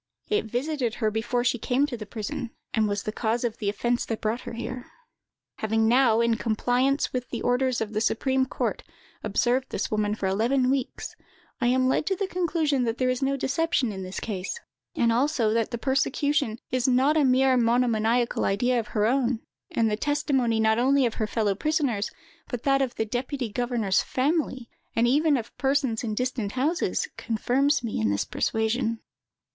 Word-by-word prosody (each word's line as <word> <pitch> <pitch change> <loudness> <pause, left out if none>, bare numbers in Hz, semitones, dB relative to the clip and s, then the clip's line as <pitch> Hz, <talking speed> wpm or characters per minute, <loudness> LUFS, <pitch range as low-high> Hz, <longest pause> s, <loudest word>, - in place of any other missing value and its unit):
It 425 - +1
visited 245 +1 -2
her 215 -3 0
before 230 +3 -1
she 245 -1 +1
came 255 +5 +1
to 285 -4 -5
the 215 -3 -8
prison, 220 +2 -4 0.2
and 220 -2 +2
was 205 0 -2
the 215 - -3
cause 225 +2 -1
of 235 -2 -2
the 205 - 0
offence 240 +4 0
that 225 - -3
brought 220 +3 -1
her - - -8
here. 245 +2 -6 0.7
Having 220 +1 +1
now, 235 -2 +4
in 235 -1 +2
compliance 245 +5 +1
with 250 -1 -3
the 235 - -4
orders 250 0 +1
of 220 -1 -3
the 215 - 0
supreme 260 +3 +1
court, - - -2 0.4
observed 240 +5 +1
this - - -3
woman 210 -1 0
for 200 - -4
eleven 245 +7 +2
weeks, 270 -2 -3 0.5
I 240 - +3
am 255 +1 +3
led 265 - +1
to 385 - +1
the 395 - -1
conclusion 325 -7 0
that 230 +1 -1
there 255 -1 +2
is 255 - -3
no 275 0 +1
deception 275 -3 0
in 190 -2 -6
this 185 0 -5
case, 200 - -4 0.4
and 230 -1 +3
also 240 -2 +2
that 230 -1 +1
the 235 - -3
persecution 275 -1 0
is 255 0 +1
not 260 +4 +3
a 310 - +4
mere 260 0 +4
monomaniacal 235 -1 +2
idea 245 +5 +2
of 225 - -4
her 210 - +3
own, 245 -1 +1 0.3
and 230 - +1
the - - +1
testimony 270 -4 +1
not 220 +1 +3
only 270 +2 +3
of 230 - 0
her 215 - +1
fellow 210 -2 0
prisoners, 260 -3 0 0.4
but 245 -2 -4
that 275 -1 +3
of 260 -3 -1
the 220 - -1
deputy 250 +2 -3
governor's 235 -4 +1
family, 265 -3 -1 0.3
and 230 +1 +3
even 295 +3 +3
of 230 -2 -7
persons 270 -5 +1
in 215 -2 -2
distant 250 -4 -2
houses, 300 +8 0
confirms 260 +5 +1
me 220 - -2
in 110 - +2
this 100 0 0
persuasion. 225 +1 -1
245 Hz, 190 wpm, -26 LUFS, 220-265 Hz, 0.7 s, now